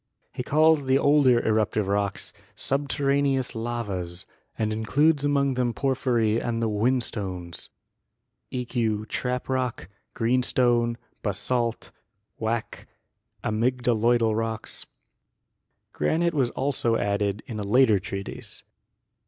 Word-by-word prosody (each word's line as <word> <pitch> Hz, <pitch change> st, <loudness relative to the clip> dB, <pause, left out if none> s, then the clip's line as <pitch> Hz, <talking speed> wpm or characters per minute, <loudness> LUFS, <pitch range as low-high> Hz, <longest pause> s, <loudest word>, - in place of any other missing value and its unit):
He -, -, -4 dB
calls 155 Hz, +1 st, +3 dB
the 130 Hz, +1 st, +4 dB
older 140 Hz, -4 st, +4 dB
eruptive 110 Hz, -2 st, +1 dB
rocks 100 Hz, 0 st, -1 dB, 0.2 s
"subterraneous 140 Hz, -1 st, 0 dB
lavas" 105 Hz, -7 st, -4 dB, 0.3 s
and 110 Hz, -1 st, 0 dB
includes 140 Hz, +8 st, +2 dB
among 140 Hz, -1 st, +2 dB
them 125 Hz, -2 st, 0 dB
porphyry 120 Hz, -5 st, +1 dB
and 115 Hz, -1 st, -2 dB
the 115 Hz, -, +1 dB
whinstones 105 Hz, -6 st, -2 dB, 0.8 s
(eq. 115 Hz, -4 st, -1 dB
trap 125 Hz, 0 st, -2 dB
rock, 130 Hz, -8 st, -2 dB, 0.3 s
green 120 Hz, +3 st, +2 dB
stone, 120 Hz, -2 st, +2 dB, 0.2 s
basalt, 115 Hz, +3 st, -2 dB, 0.5 s
wacke, 110 Hz, 0 st, -3 dB, 0.6 s
amygdaloidal 115 Hz, 0 st, +2 dB
rocks). 115 Hz, 0 st, 0 dB, 1.1 s
Granite 170 Hz, +1 st, +1 dB
was 135 Hz, -5 st, +1 dB
also 130 Hz, -4 st, 0 dB
added 100 Hz, 0 st, -1 dB
in 110 Hz, -3 st, -6 dB
a -, -, -2 dB
later 110 Hz, 0 st, +4 dB
treatise. 100 Hz, +2 st, -6 dB
120 Hz, 105 wpm, -26 LUFS, 110-130 Hz, 1.1 s, the